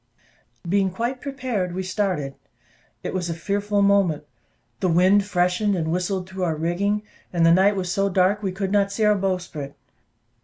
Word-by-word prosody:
Being 195 +2 +2
quite 235 +7 -3
prepared, 250 -10 -3
we 190 - -2
started. 185 -7 -1 0.7
It - - -4
was 180 -2 -2
a 165 - -2
fearful 200 +3 0
moment; 195 -7 +3 0.6
the 185 - +1
wind 185 +4 +4
freshened, 180 +2 +1
and 160 -2 -1
whistled 180 +1 -1
through 190 0 -5
our 165 -3 0
rigging, 190 +6 0 0.3
and 170 -2 +2
the 165 - +6
night 195 +3 +4
was 180 -2 -2
so 195 +1 +1
dark, 190 +2 +2
that 210 - -7
we 190 - 0
could 195 +1 -3
not 200 -1 +2
see 215 +2 0
our 210 - +5
bowsprit. 180 -8 -3
190 Hz, 180 wpm, -23 LUFS, 175-205 Hz, 0.7 s, the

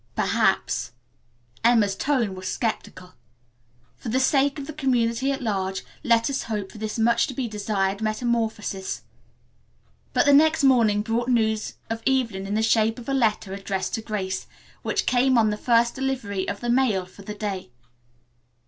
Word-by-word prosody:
"Perhaps," - - +1 0.7
Emma's 225 -4 +4
tone 250 -5 0
was 185 0 -7
skeptical. 185 -5 -4 0.8
"For 235 - -6
the 255 +4 +1
sake 275 +2 +2
of 285 - -5
the 310 - -7
community 260 -2 +1
at 270 -1 -3
large 190 -3 -2 0.2
let 230 -4 +3
us 280 -1 -1
hope 210 -4 -4
for 215 - -11
this 215 +1 -4
much 235 +1 +3
to 260 - -7
be 255 -2 -2
desired 205 -2 -1
metamorphosis." 220 -3 -2 1.1
But - - +2
the 285 - +6
next 310 +1 +5
morning 225 -6 +4
brought 235 +2 -1
news 220 -3 +1
of 225 0 -4
Evelyn 230 -8 0
in 205 - -2
the 220 - +1
shape 225 0 +2
of 245 +1 -8
a - - 0
letter 220 -6 +1
addressed 195 -1 -3
to 225 - -1
Grace, 195 -4 -3 0.3
which - - -1
came 255 0 +3
on 220 -2 +4
the - - -1
first 235 +1 +2
delivery 245 -8 -2
of 200 - -5
the 240 - -2
mail 235 -7 +2
for 185 +2 -15
the 210 +1 -7
day. 200 - -4
225 Hz, 165 wpm, -24 LUFS, 205-255 Hz, 1.1 s, the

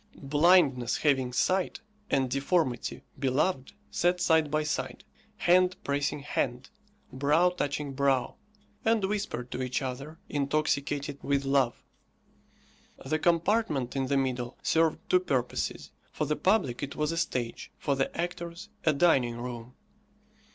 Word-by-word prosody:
Blindness 145 -4 +3
having 135 -4 +2
sight 185 +9 +1 0.3
and 135 -1 +2
deformity 135 0 0 0.2
beloved 135 +2 0 0.2
sat 175 +1 +1
side 160 -4 +3
by 155 +1 +1
side, 150 - -3 0.3
hand 180 +1 +4
pressing 140 0 -1
hand, 130 -2 -2 0.4
brow 150 +7 +3
touching 145 -4 -3
brow, 135 -2 +1 0.5
and 225 -3 +2
whispered 195 - -3
to 130 - -3
each 130 0 -1
other, 135 +4 -5
intoxicated 145 0 -1
with 140 -1 0
love. 135 -3 +1 1.2
The 155 +3 0
compartment 170 - +1
in 135 -1 0
the 140 +1 +1
middle 125 -2 -2
served 160 -1 +3
two 180 - +4
purposes 125 - -2 0.2
for - - -2
the 150 - 0
public 185 - +1
it 140 -1 -4
was 150 +1 0
a - - -2
stage, 125 -8 -2
for 140 - 0
the 135 0 0
actors 170 0 -4
a 155 - +3
dining 135 -6 +3
room. 120 0 -7
140 Hz, 130 wpm, -29 LUFS, 130-170 Hz, 1.2 s, hand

